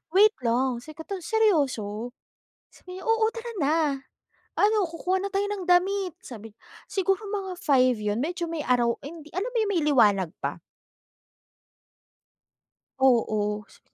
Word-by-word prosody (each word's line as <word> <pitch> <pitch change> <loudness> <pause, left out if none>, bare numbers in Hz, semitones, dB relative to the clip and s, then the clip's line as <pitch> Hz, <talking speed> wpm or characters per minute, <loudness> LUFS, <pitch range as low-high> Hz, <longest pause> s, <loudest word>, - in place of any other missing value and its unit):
"Wait 425 +2 +6
lang, 240 +1 +1
sikata 320 +6 -7
seryoso?" 265 - +1 0.6
sabi 365 0 -11
niya, - - -10
"Oo 450 -1 +3
tara 470 0 -6
na. 295 +3 +3 0.8
Ano 420 -1 +4
kukuha 370 +3 -1
na 400 - -3
tayo 400 +1 +1
ng 400 -3 -3
damit," 370 0 +2
sabi 225 -3 -10
niya. - - -52 0.3
Siguro 390 +1 0
mga 390 -2 -3
5 255 -4 +3
'yun, 210 +2 -1
medyo 345 +2 -2
may 325 -3 -3
araw 240 -2 +3
hindi, 310 +1 -10
alam 405 +7 -2
mo - - -6
'yung 410 - 0
may 330 - +1
liwanag 205 - +4
pa. - - -3 2.4
Oo. 215 -5 +2
Sa - - -20
320 Hz, 140 wpm, -26 LUFS, 240-395 Hz, 2.4 s, Wait